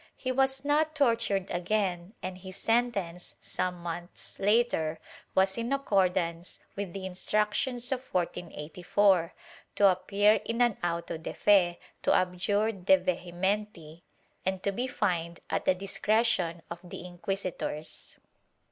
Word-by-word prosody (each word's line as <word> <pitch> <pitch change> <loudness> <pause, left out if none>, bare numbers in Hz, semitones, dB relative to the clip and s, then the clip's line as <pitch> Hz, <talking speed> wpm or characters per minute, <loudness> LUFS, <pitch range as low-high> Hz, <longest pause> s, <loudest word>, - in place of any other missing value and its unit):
He 255 - -3
was 270 +1 +1
not 305 +2 +2
tortured 230 -8 +2
again 180 +1 -1
and 185 0 -5
his 185 0 -8
sentence, 205 -7 0
some 180 0 -2
months 175 +1 -6
later, 200 -7 +2 0.4
was 190 +2 +3
in 230 +3 -2
accordance 185 -9 0 0.2
with 200 -3 -4
the 195 -1 -5
Instructions 215 +7 0
of 260 -1 -3
1484 175 +1 +1 0.2
— - - -23
to 200 - +6
appear 200 +3 +3
in 230 +1 -3
an 240 -3 +3
auto 170 -1 -2
de 160 - -6
fe, 185 -4 +4 0.2
to - - +2
abjure 195 +4 +1
de 190 -2 +4
vehementi 180 -1 -2 0.4
and 190 0 -2
to 200 - +1
be 245 +6 -2
fined 170 -8 -1
at - - 0
the 185 - +4
discretion 195 -3 +1
of 170 - -5
the 175 0 -8
inquisitors. 180 -3 -4
190 Hz, 130 wpm, -29 LUFS, 175-215 Hz, 0.4 s, to